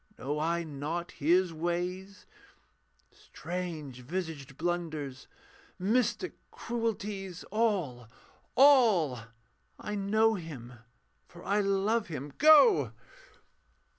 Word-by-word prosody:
Know 145 Hz, +3 st, -3 dB
I 170 Hz, +2 st, 0 dB
not 160 Hz, +3 st, -4 dB
His 175 Hz, +3 st, +2 dB
ways? 180 Hz, +4 st, -4 dB, 0.9 s
Strange 160 Hz, -4 st, -6 dB
visaged 145 Hz, -1 st, -5 dB
blunders, 155 Hz, -6 st, -3 dB, 0.5 s
mystic 235 Hz, -, 0 dB, 0.2 s
cruelties. 210 Hz, -6 st, -4 dB
All! 185 Hz, -, 0 dB, 0.5 s
all! 225 Hz, -, +5 dB, 0.6 s
I 210 Hz, -, -5 dB
know 215 Hz, +2 st, +2 dB
Him, 150 Hz, -, -7 dB, 0.5 s
for 175 Hz, 0 st, -14 dB
I 205 Hz, +1 st, +2 dB
love 200 Hz, +3 st, +1 dB
Him. 145 Hz, -3 st, -6 dB
Go! 270 Hz, -, +6 dB
175 Hz, 85 wpm, -30 LUFS, 150-210 Hz, 0.9 s, Go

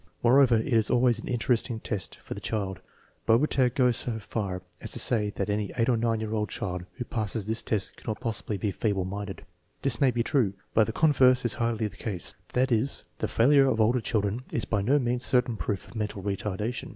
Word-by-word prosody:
Moreover, 125 Hz, 0 st, +6 dB
it 110 Hz, -, -1 dB
is 115 Hz, -5 st, +2 dB
always 120 Hz, -2 st, +3 dB
an -, -, -8 dB
interesting 120 Hz, -1 st, 0 dB
test 105 Hz, -5 st, -4 dB
for -, -, -6 dB
the -, -, -7 dB
child. 100 Hz, -4 st, -3 dB, 0.5 s
Bobertag 125 Hz, +1 st, +3 dB
goes 125 Hz, -3 st, +3 dB
so 120 Hz, -2 st, -3 dB
far 100 Hz, -4 st, -4 dB, 0.2 s
as 110 Hz, -, -6 dB
to -, -, -2 dB
say 105 Hz, -4 st, +2 dB
that 100 Hz, -, -2 dB
any 105 Hz, -1 st, -1 dB
8 115 Hz, +1 st, +2 dB
or 120 Hz, -, +3 dB
9 115 Hz, -1 st, 0 dB
year 110 Hz, -1 st, -1 dB
child 90 Hz, -2 st, -4 dB
who 125 Hz, -, -5 dB
passes 110 Hz, -3 st, -2 dB
this 110 Hz, +2 st, -1 dB
test 105 Hz, -2 st, -1 dB
cannot 110 Hz, -2 st, -5 dB
possibly 110 Hz, -2 st, -3 dB
be 100 Hz, +2 st, -1 dB
feeble 100 Hz, -3 st, -1 dB
minded. 100 Hz, +1 st, -6 dB, 0.4 s
This 130 Hz, -5 st, +3 dB
may 135 Hz, -, +5 dB
be 120 Hz, -1 st, 0 dB
true; 120 Hz, -6 st, +1 dB, 0.2 s
but 110 Hz, -1 st, +4 dB
the -, -, -1 dB
converse 130 Hz, -3 st, +4 dB
is 120 Hz, -, +2 dB
hardly 115 Hz, -2 st, -1 dB
the 100 Hz, -1 st, -6 dB
case; 95 Hz, -6 st, -2 dB, 0.2 s
that 130 Hz, +1 st, +2 dB
is, 120 Hz, +4 st, 0 dB, 0.2 s
the -, -, 0 dB
failure 135 Hz, +3 st, +4 dB
of 115 Hz, -4 st, +1 dB
older 115 Hz, +3 st, +3 dB
children 105 Hz, +1 st, -1 dB
is 115 Hz, -, -1 dB
by 105 Hz, -3 st, 0 dB
no 130 Hz, +9 st, +3 dB
means 125 Hz, -2 st, 0 dB
certain 125 Hz, -2 st, +2 dB
proof 100 Hz, -2 st, -3 dB
of -, -, -15 dB
mental 105 Hz, -3 st, -3 dB
retardation. 105 Hz, +4 st, -3 dB
115 Hz, 210 wpm, -27 LUFS, 105-125 Hz, 0.5 s, Moreover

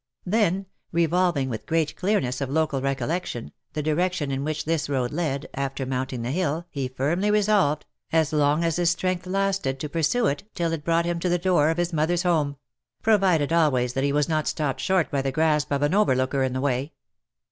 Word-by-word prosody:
Then, 195 Hz, -1 st, +1 dB, 0.3 s
revolving 170 Hz, -3 st, +2 dB
with 115 Hz, -4 st, -5 dB
great 160 Hz, -2 st, 0 dB
clearness 165 Hz, -11 st, 0 dB
of 135 Hz, -, -2 dB
local 150 Hz, -2 st, 0 dB
recol 135 Hz, -1 st, -1 dB
lection, 165 Hz, -9 st, -3 dB, 0.2 s
the 150 Hz, -, -2 dB
direction 155 Hz, -1 st, 0 dB
in 135 Hz, 0 st, -2 dB
which 155 Hz, 0 st, -3 dB
this 160 Hz, -2 st, -1 dB
road 130 Hz, -3 st, 0 dB
led, 150 Hz, -4 st, -2 dB
after 135 Hz, 0 st, -3 dB
mounting 130 Hz, -1 st, -3 dB
the 120 Hz, -, -2 dB
hill, 165 Hz, 0 st, -1 dB
he 135 Hz, -2 st, -2 dB
firmly 150 Hz, +10 st, 0 dB
resolved, 205 Hz, -8 st, +2 dB, 0.3 s
as 160 Hz, -1 st, +2 dB
long 150 Hz, +2 st, +2 dB
as 165 Hz, -1 st, 0 dB
his 175 Hz, -1 st, +3 dB
strength 180 Hz, 0 st, -1 dB
lasted, 195 Hz, -8 st, 0 dB
to 150 Hz, -, -3 dB
pursue 165 Hz, +11 st, +1 dB
it, 145 Hz, +1 st, 0 dB
till 170 Hz, -2 st, 0 dB
it 155 Hz, -3 st, -4 dB
brought 165 Hz, +1 st, +2 dB
him 170 Hz, 0 st, -1 dB
to 180 Hz, -, -1 dB
the 175 Hz, -, +2 dB
door 175 Hz, -4 st, +3 dB
of 165 Hz, -, 0 dB
his 175 Hz, 0 st, -1 dB
mother's 165 Hz, +3 st, +1 dB
home 155 Hz, -5 st, +1 dB, 0.2 s
— -, -, -58 dB
provided 185 Hz, -8 st, +3 dB
always, 130 Hz, -7 st, +2 dB
that 135 Hz, -, -1 dB
he 140 Hz, -, +2 dB
was 145 Hz, 0 st, +1 dB
not 155 Hz, -2 st, 0 dB
stopped 145 Hz, -4 st, -1 dB
short 185 Hz, -3 st, +1 dB
by 140 Hz, -, +1 dB
the 135 Hz, 0 st, -1 dB
grasp 150 Hz, 0 st, +1 dB
of 140 Hz, 0 st, +1 dB
an 145 Hz, +3 st, +2 dB
overlooker 135 Hz, -9 st, +2 dB
in 130 Hz, -1 st, 0 dB
the 130 Hz, -, -2 dB
way. 135 Hz, +2 st, -1 dB
155 Hz, 210 wpm, -25 LUFS, 140-175 Hz, 0.3 s, his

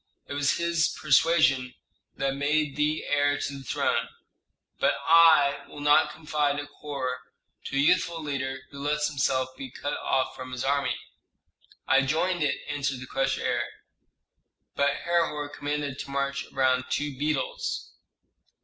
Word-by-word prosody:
It -, -, -7 dB
was 145 Hz, +1 st, +1 dB
his 170 Hz, -1 st, +1 dB
persuasion 150 Hz, -4 st, +3 dB, 0.4 s
that 135 Hz, 0 st, -1 dB
made 145 Hz, +1 st, 0 dB
thee 150 Hz, +1 st, 0 dB
heir 145 Hz, 0 st, +2 dB
to 140 Hz, -, -4 dB
the -, -, -11 dB
throne. 125 Hz, -, 0 dB, 0.7 s
But -, -, +3 dB
I 160 Hz, -4 st, +6 dB
will -, -, -11 dB
not 145 Hz, 0 st, +4 dB
confide 150 Hz, -2 st, -1 dB
a 145 Hz, -, -4 dB
corps 140 Hz, -3 st, -5 dB, 0.5 s
to -, -, -5 dB
a -, -, +2 dB
youthful 170 Hz, +2 st, +3 dB
leader 135 Hz, -2 st, -3 dB
who 140 Hz, -, -9 dB
lets 150 Hz, +1 st, 0 dB
himself 135 Hz, -3 st, 0 dB
be 130 Hz, 0 st, -7 dB
cut 145 Hz, +3 st, -4 dB
off 130 Hz, -, 0 dB
from 130 Hz, 0 st, -8 dB
his 125 Hz, -, -3 dB
army." 140 Hz, -1 st, +1 dB, 0.9 s
"I 135 Hz, -, +5 dB
joined 165 Hz, +6 st, 0 dB
it," 145 Hz, -2 st, 0 dB
answered 140 Hz, -2 st, -2 dB
the 130 Hz, -, -7 dB
crushed 135 Hz, +1 st, 0 dB
heir; -, -, 0 dB, 1.1 s
"but 140 Hz, 0 st, +3 dB, 0.2 s
Herhor 165 Hz, -4 st, 0 dB
commanded 145 Hz, -1 st, -3 dB
to -, -, -6 dB
march 140 Hz, 0 st, -2 dB
around 130 Hz, -1 st, +2 dB
two 145 Hz, -1 st, -2 dB
beetles." 145 Hz, 0 st, -2 dB
145 Hz, 150 wpm, -27 LUFS, 135-150 Hz, 1.1 s, I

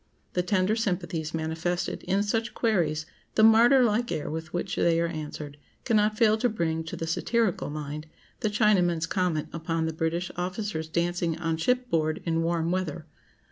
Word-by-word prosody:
The 180 Hz, -, +2 dB
tender 185 Hz, +3 st, +1 dB
sympathies 180 Hz, -7 st, -2 dB
manifested 165 Hz, +2 st, -2 dB
in 195 Hz, +2 st, +1 dB
such 225 Hz, +2 st, -1 dB
queries, 165 Hz, -9 st, +1 dB, 0.3 s
the 215 Hz, -, +4 dB
martyr 235 Hz, +4 st, +7 dB
like 235 Hz, +1 st, +1 dB
air 150 Hz, -, -2 dB
with 160 Hz, +1 st, -5 dB
which 175 Hz, +2 st, -2 dB
they 165 Hz, -1 st, +3 dB
are 170 Hz, -, +2 dB
answered, 150 Hz, -3 st, -6 dB, 0.3 s
cannot 215 Hz, -2 st, +2 dB
fail 220 Hz, -1 st, +4 dB
to 245 Hz, -, +2 dB
bring 165 Hz, -6 st, -1 dB
to 165 Hz, -, -5 dB
the 165 Hz, -, -4 dB
satirical 215 Hz, +4 st, 0 dB
mind 150 Hz, +1 st, -5 dB, 0.3 s
the 215 Hz, -, 0 dB
Chinaman's 190 Hz, -6 st, +3 dB
comment 170 Hz, -3 st, -1 dB
upon 165 Hz, 0 st, -1 dB
the 160 Hz, -, -2 dB
British 165 Hz, +3 st, -2 dB
officers' 180 Hz, -2 st, -3 dB
dancing 170 Hz, 0 st, 0 dB
on 165 Hz, -1 st, -1 dB
shipboard 165 Hz, -7 st, 0 dB
in 165 Hz, -1 st, +1 dB
warm 165 Hz, 0 st, 0 dB
weather. 185 Hz, -4 st, -2 dB
175 Hz, 165 wpm, -27 LUFS, 160-210 Hz, 0.3 s, martyr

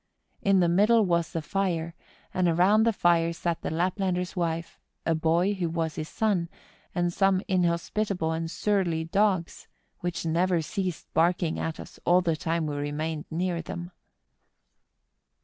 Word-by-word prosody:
In 195 Hz, -2 st, +4 dB
the 175 Hz, -, +4 dB
middle 210 Hz, +6 st, +4 dB
was 170 Hz, -3 st, +1 dB
the 165 Hz, -, -3 dB
fire, 170 Hz, -3 st, -1 dB, 0.4 s
and 185 Hz, -1 st, +2 dB
around 190 Hz, +7 st, +4 dB
the -, -, +5 dB
fire 170 Hz, -4 st, +2 dB
sat 170 Hz, 0 st, -2 dB
the -, -, -3 dB
Laplander's 180 Hz, +2 st, -1 dB
wife, 170 Hz, -1 st, -2 dB, 0.3 s
a 165 Hz, -, +2 dB
boy, 165 Hz, +5 st, +2 dB
who 180 Hz, -4 st, -2 dB
was 165 Hz, -1 st, -2 dB
his 155 Hz, 0 st, -5 dB
son, 195 Hz, -6 st, 0 dB, 0.5 s
and 175 Hz, -1 st, 0 dB
some 195 Hz, 0 st, +2 dB
inhospitable 180 Hz, 0 st, 0 dB
and 165 Hz, 0 st, -2 dB
surly 180 Hz, -4 st, 0 dB
dogs, 185 Hz, 0 st, 0 dB, 0.3 s
which 175 Hz, -1 st, -3 dB
never 170 Hz, +2 st, +2 dB
ceased 185 Hz, -1 st, -3 dB
barking 170 Hz, 0 st, +2 dB
at 165 Hz, -1 st, -3 dB
us -, -, -11 dB
all 180 Hz, +1 st, +4 dB
the 165 Hz, -3 st, +1 dB
time 165 Hz, +1 st, -1 dB
we 145 Hz, -1 st, -3 dB
remained 150 Hz, +2 st, -3 dB
near 175 Hz, +1 st, -1 dB
them. 175 Hz, +1 st, -7 dB
175 Hz, 150 wpm, -27 LUFS, 165-185 Hz, 0.5 s, the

